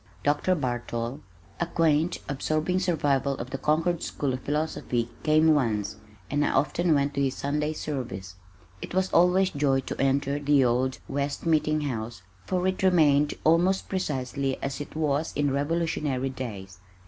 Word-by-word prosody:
Dr. 150 +6 +2
Bartol, 120 -2 -3 0.4
a 170 - 0
quaint 165 0 +2
absorbing 155 +5 0
survival 145 -6 +1
of 125 +2 -6
the 135 - -3
Concord 165 +4 +1
School 140 -3 -2
of 130 - -3
Philosophy, 145 -5 -1
came 155 +1 +4
once, 110 -8 0 0.3
and 145 +1 +2
I - - +2
often 150 +4 +2
went 140 0 +1
to 140 - -1
his 135 -1 0
Sunday 150 +2 -1
service. 120 -12 -5 0.5
It - - -6
was 190 0 0
always 180 +2 +4
joy 140 -2 +1
to - - -5
enter 140 +1 +1
the 145 -2 +3
old 125 +2 +1
West 140 +2 -3
Meeting 155 -1 +2
House 115 -8 -4 0.2
for 185 -1 0
it 185 0 0
remained 150 -6 +4
almost 175 +4 +3
precisely 135 -6 -2
as 140 +1 -3
it 145 - -8
was 155 0 0
in 145 -1 +1
Revolutionary 145 -2 -1
days. 100 -8 -7
145 Hz, 155 wpm, -27 LUFS, 135-160 Hz, 0.5 s, came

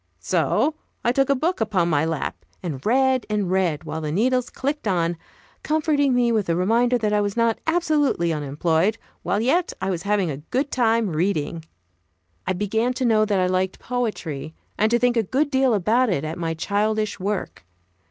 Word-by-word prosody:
So 310 - +1 0.3
I 240 - +3
took 270 +2 +1
a 280 - +4
book 320 +2 -1
upon 200 -6 +1
my 155 -2 +2
lap 160 -3 -3 0.2
and 145 -7 -5
read, 260 +2 +3
and 205 -4 -1
read, 180 -6 +1
while 160 - -5
the 150 -1 -3
needles 250 +7 +1
clicked 285 -2 -3
on, 175 -3 +1 0.5
comforting 295 -3 +1
me 240 -1 +3
with 215 -4 0
the 165 - +1
reminder 235 +7 +2
that 215 -2 -1
I 210 - +3
was 205 +1 -2
not 230 -1 +2
absolutely 300 - +1
unemployed, 160 +7 0 0.2
while 200 - 0
yet 325 +9 +1
I 195 - -1
was 175 -2 -3
having 200 -4 0
a 135 - -5
good 260 - -2
time 230 -4 +2
reading. 165 -1 -1 0.8
I 190 - +1
began 220 +6 0
to 255 0 -2
know 215 -2 +4
that 205 -3 +1
I 185 - +2
liked 185 +1 0
poetry, 195 - -4 0.2
and 215 - +2
to 235 - +3
think 245 0 +2
a - - +5
good 275 +8 0
deal 265 -3 +3
about 225 +6 +2
it 170 -7 0
at 155 +2 -4
my 165 -1 -2
childish 210 +5 -1
work. 200 +1 -3
210 Hz, 190 wpm, -23 LUFS, 175-250 Hz, 0.8 s, a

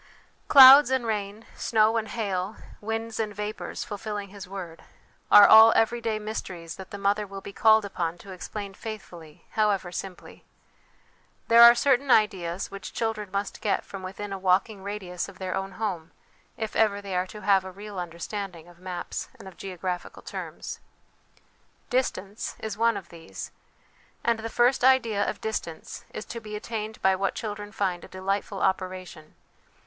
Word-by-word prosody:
"Clouds 270 0 +10
and 260 -2 0
rain, 210 0 -3
snow 220 0 +2
and 220 -1 -1
hail, 200 -2 -3 0.3
winds 225 +1 -4
and 210 -2 -2
vapours, 210 +1 -5
fulfilling 205 -1 -5
His 200 -1 -10
word" 180 -4 -8 0.5
are 205 - +10
all 220 +1 +9
everyday 225 -1 +1
mysteries 185 -6 -6
that 190 -1 -10
the 200 - -7
mother 200 +1 0
will 195 0 -7
be 200 +1 -10
called 220 0 +5
upon 175 -4 -3
to 195 +3 -12
explain 200 +2 -7
faithfully, 180 -8 -10
however 205 -4 +1
simply. 185 +1 -8 1.1
There 230 0 +8
are 235 0 +10
certain 270 +2 +2
ideas 190 -6 +2
which 195 0 -8
children 220 -3 -2
must 200 0 -3
get 205 - 0
from 195 - -8
within 195 +2 -6
a 195 - -5
walking 190 +2 +1
radius 190 -3 -5
of - - -14
their 185 -1 -4
own 195 0 -4
home 185 -6 -4 0.5
if 220 -2 -4
ever 210 -2 +3
they 200 -2 -5
are 180 +1 0
to 210 +3 -10
have 195 -1 +3
a 190 - -8
real 200 0 -8
understanding 175 0 -6
of 175 -1 -17
maps 180 -1 -5
and - - -12
of 190 - -11
geographical 180 -1 -5
terms. - - -7 1.1
Distance 215 -5 -2
is 220 -2 -5
one 230 0 +2
of 190 -4 -9
these, 160 - -9 0.7
and 235 -1 +1
the 225 +1 -5
first 245 +3 +2
idea 240 -6 +3
of - - -6
distance 190 -7 -5
is 215 - -7
to 235 - -6
be 210 -1 -7
attained 220 0 -5
by 190 0 +4
what 195 +1 -1
children 205 -2 -5
find 190 -5 -2
a - - -10
delightful 195 +1 -3
operation. 185 -4 -3
200 Hz, 165 wpm, -26 LUFS, 185-220 Hz, 1.1 s, Clouds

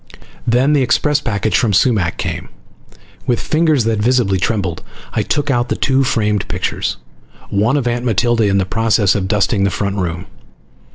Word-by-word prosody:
Then 125 +5 +3
the 145 - +3
express 145 +4 +1
package 110 -3 -1
from 115 -5 +2
Sumac 100 -4 +2
came. - - -4 0.8
With 120 -2 +1
fingers 155 -5 +1
that 110 -1 0
visibly 110 -4 +2
trembled 95 -5 -1 0.3
I - - +1
took 145 -1 -1
out 120 -2 0
the - - 0
two 135 0 +1
framed 105 -5 0
pictures, - - -2 0.5
one 110 +8 +2
of 130 -4 -1
Aunt 120 0 -1
Matilda 120 0 +1
in 100 -1 +2
the 95 - +1
process 110 -1 +2
of 95 -2 -2
dusting 100 0 +1
the 100 - +2
front 100 +1 -2
room. 90 -1 -3
115 Hz, 170 wpm, -17 LUFS, 100-125 Hz, 0.8 s, Then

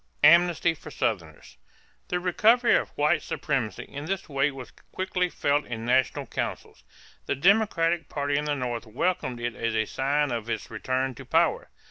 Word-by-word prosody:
=Amnesty 170 +1 +5
for 160 - -11
Southerners.= - - -4 0.5
The 180 - -1
recovery 220 +7 +4
of - - 0
white 150 +2 +2
supremacy 130 -7 -2
in 145 +1 -8
this 190 +2 -3
way 140 -1 +1
was 135 -3 -9
quickly 185 -1 -3
felt 145 -2 0
in 115 -1 -6
national 130 +1 +1
councils. - - -5 0.4
The - - 0
Democratic 175 -2 +2
party 145 0 -1
in 145 +1 0
the 150 -1 0
North 120 -3 -4
welcomed 130 +1 -1
it 120 0 -2
as 115 +1 -2
a 110 0 +1
sign 140 +4 0
of 115 -1 -3
its 110 -1 -4
return 130 +3 -1
to - - -11
power. - - +1
145 Hz, 165 wpm, -26 LUFS, 125-175 Hz, 0.5 s, =Amnesty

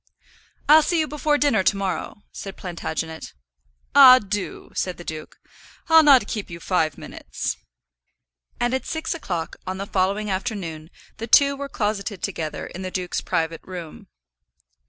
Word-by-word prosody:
"I'll 310 +2 +8
see 340 +2 0
you 310 - +1
before 300 0 0
dinner 285 -9 +3
to 195 +2 +2
morrow," 195 +1 -4
said 195 -1 -8
Plantagenet. 160 -2 -5 0.6
"Ah, 260 -3 +10
do," 205 -4 -5
said 185 -1 -2
the 175 - -9
duke. 155 -2 -8 0.5
"I'll 325 0 +8
not 275 -7 +6
keep 210 -1 -5
you 170 0 -8
five 160 -4 0
minutes." - - -5 1.0
And 240 +1 0
at 260 - -2
six 320 0 -2
o'clock 175 - -4
on 185 0 -3
the 195 - -4
following 200 +2 0
afternoon 185 -7 -4 0.3
the 225 - -5
two 280 +4 +5
were 280 0 -6
closeted 205 -4 -3
together 165 -6 -4
in 185 - -8
the 185 - -4
duke's 180 -1 -3
private 165 -2 -2
room. 175 -4 -9
195 Hz, 155 wpm, -23 LUFS, 175-255 Hz, 1.0 s, Ah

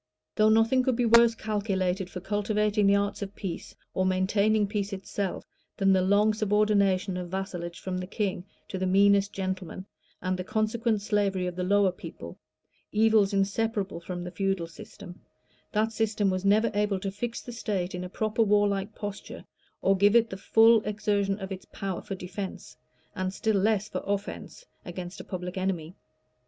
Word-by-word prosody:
Though 215 0 +4
nothing 225 +4 +4
could 255 -1 +1
be 245 0 +1
worse 235 0 +6
calculated 195 -4 -1
for 180 - -7
cultivating 210 +1 +1
the 200 - +5
arts 200 +1 -1
of 200 0 -5
peace, 180 -4 -6 0.2
or 185 - +1
maintaining 200 +3 +2
peace 200 0 -3
itself, 195 0 -4 0.3
than 195 -1 +4
the 190 - +3
long 205 +3 +3
subordination 205 -3 +2
of 180 -1 -5
vassalage 175 -2 -4
from 185 -1 -3
the 180 - -5
king 195 -3 -2 0.3
to 190 - -4
the 185 - 0
meanest 200 +1 +4
gentleman, 190 -1 -4 0.3
and 185 0 -1
the - - -2
consequent 215 +1 0
slavery 200 -3 +1
of 180 -1 -3
the 180 - -2
lower 200 0 +3
people, 160 - -10 0.5
evils 215 -2 +4
inseparable 200 -1 0
from 175 +1 -6
the 180 - -6
feudal 195 -1 -1
system, 175 +2 -12 0.5
that 220 +1 +1
system 215 -3 +1
was 185 0 -2
never 210 +3 +3
able 205 -1 +1
to 195 +1 -3
fix 230 +4 -4
the 245 - -8
state 200 -6 -3
in 180 0 -4
a 180 - -6
proper 215 +4 -1
warlike 205 -1 +2
posture, 205 -1 -7 0.4
or 195 - +4
give 205 +3 +4
it 230 -1 +4
the - - -4
full 225 +3 +5
exertion 205 -1 0
of 195 -1 -7
its 190 -1 -6
power 195 -3 -5
for 195 - -5
defence, 190 +1 -7 0.4
and 185 -1 -2
still 220 -2 +1
less 210 +1 +2
for - - -4
offence, 200 - -4 0.2
against 175 0 -7
a - - -10
public 180 0 -5
enemy. 180 -3 -2
200 Hz, 175 wpm, -28 LUFS, 185-210 Hz, 0.5 s, worse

